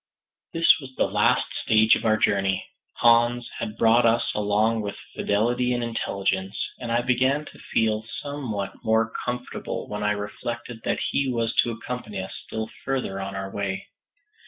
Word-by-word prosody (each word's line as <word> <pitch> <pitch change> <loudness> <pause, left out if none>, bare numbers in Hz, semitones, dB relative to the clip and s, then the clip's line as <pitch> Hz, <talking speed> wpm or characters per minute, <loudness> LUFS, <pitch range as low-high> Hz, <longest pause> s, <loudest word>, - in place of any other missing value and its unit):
This 165 0 +5
was 130 -3 -10
the - - +2
last - - +3 0.2
stage 110 0 +5
of - - -4
our 110 0 +4
journey. 95 -2 +1 0.3
Hans 120 +1 +4
had 110 -1 -4
brought 115 +1 +5
us 115 +1 +3
along 105 +2 +1
with 100 -1 -5 0.2
fidelity 120 +4 +1
and 120 - -1
intelligence, 100 -4 -1 0.2
and 120 -2 -4
I 120 +1 +2
began 130 +4 +2
to - - -13
feel 110 -1 0 0.2
somewhat 120 -9 -5
more 110 0 +2
comfortable 125 0 -4
when 105 0 -4
I 105 0 +2
reflected 115 +3 -5
that - - +1
he 140 -1 +1
was 115 -2 0
to 120 - +5
accompany 115 -3 -5
us 95 - -5
still 110 0 -4 0.2
farther 130 -8 -2
on 95 0 -5
our 95 0 -4
way. 100 -1 -3
115 Hz, 160 wpm, -25 LUFS, 105-120 Hz, 0.3 s, This